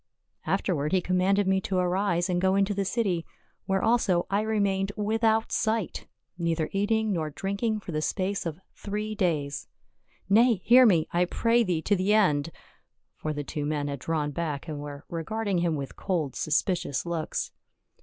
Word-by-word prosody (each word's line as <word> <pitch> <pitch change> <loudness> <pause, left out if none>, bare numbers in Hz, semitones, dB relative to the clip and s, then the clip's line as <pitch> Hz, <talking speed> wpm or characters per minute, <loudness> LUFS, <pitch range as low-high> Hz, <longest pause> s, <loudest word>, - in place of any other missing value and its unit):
Afterward 150 -4 0
he 190 - +5
commanded 185 +2 +2
me 190 0 +2
to 190 0 -2
arise 180 -1 +1
and 175 -1 0
go 190 0 +3
into 200 +1 +2
the 200 0 -1
city, 190 -6 0 0.4
where 190 0 +1
also 220 -7 +2
I 200 +1 +2
remained 200 -3 0
without 220 +1 +1
sight, 220 -3 -1 0.3
neither 165 -2 0
eat 200 +1 0
ing 220 -2 +2
nor 160 -3 -1
drinking 200 +6 -2
for 180 - -7
the 155 -1 -1
space 190 +2 -1
of 160 +1 -5
three 210 +1 -4
days 160 -9 -1 0.3
— - - -48 0.3
Nay, 230 +4 +5
hear 250 +1 +8
me, 170 -7 +3
I 175 +1 +2
pray 230 +6 +2
thee 175 -6 -1
to 205 - +2
the 195 +3 +2
end 150 -8 +3 0.4
!" - - -52
For 155 - -2
the 145 -1 -3
two 150 +1 -4
men 145 -1 -1
had 140 -1 -4
drawn 150 +1 -1
back, 150 -1 -3
and 150 -2 -5
were 145 0 -8
regarding 200 +3 -2
him 170 -2 +1
with 140 -2 -5
cold 165 -8 -2
suspicious 155 -3 0
looks. 170 -2 -3
185 Hz, 180 wpm, -27 LUFS, 160-205 Hz, 0.4 s, hear